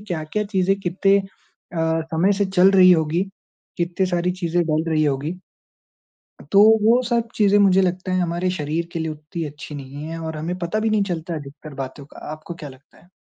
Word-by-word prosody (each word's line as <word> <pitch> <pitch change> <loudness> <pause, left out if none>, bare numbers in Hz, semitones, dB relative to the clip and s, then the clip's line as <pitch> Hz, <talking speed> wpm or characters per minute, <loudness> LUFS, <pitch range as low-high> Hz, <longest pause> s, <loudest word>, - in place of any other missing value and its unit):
क्या-क्या 180 0 -3
चीज़ें 195 -1 +1
कितने 195 +2 +2
अ, 195 0 -8 0.8
समय 180 +5 +3
से 200 +1 +1
चल 190 0 +4
रही 185 -2 +7
होगी, 160 +1 +1 0.5
कितनी 175 +2 0
सारी 175 0 0
चीज़ें 175 0 +1
डल 155 +1 0
रही 155 -1 +2
होगी। 145 +3 -1 1.2
तो 200 +1 +7 0.2
वो 235 +3 +5
सब 235 -1 +1
चीज़ें 205 -1 +4
मुझे 195 -1 +5
लगता 185 +1 -1
है 185 - +1
हमारे 175 +1 -1
शरीर 165 0 -3
के 165 - -3
लिए 160 -1 -2
उतनी 155 +2 -6
अच्छी 145 +1 -9
नहीं 140 +2 -8
है 165 +1 -5
और 160 -1 -5
हमें 170 +4 -3
पता 180 +5 -2
भी 220 0 0
नहीं 215 -2 +2
चलता 165 0 -4
अधिकतर 145 0 -10
बातों 135 +2 -11
का। - - -16
आपको 155 +2 -8
क्या 150 -4 -8
लगता 130 +4 -19
है? 175 - -23
175 Hz, 195 wpm, -22 LUFS, 155-190 Hz, 1.2 s, रही